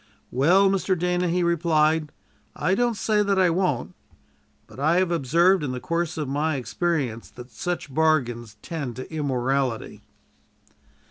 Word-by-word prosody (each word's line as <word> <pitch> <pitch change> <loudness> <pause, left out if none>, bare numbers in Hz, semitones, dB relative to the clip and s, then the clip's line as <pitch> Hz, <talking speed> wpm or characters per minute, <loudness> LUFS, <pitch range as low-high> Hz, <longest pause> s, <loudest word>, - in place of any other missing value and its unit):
"Well, 175 +10 +4
Mr. 190 -1 +1
Dana," 180 +1 0
he 180 +1 +1
replied, 160 -2 +2 0.4
"I 170 +6 0
don't 240 +1 +1
say 210 -1 +1
that 200 -1 +1
I 185 -2 +4
won't; 175 -7 -1 0.7
but - - -14
I 155 +4 +2
have 185 -1 +1
observed 170 +4 +3
in 130 -3 -2
the 125 - -4
course 165 +2 -2
of 150 -3 -2
my 145 +3 0
experience 135 -3 -2
that 125 0 -12
such 150 +4 -4
bargains 120 -8 0
tend 145 -8 -5
to 130 +5 -8
immorality." 135 -4 -1
160 Hz, 145 wpm, -24 LUFS, 135-180 Hz, 0.7 s, Well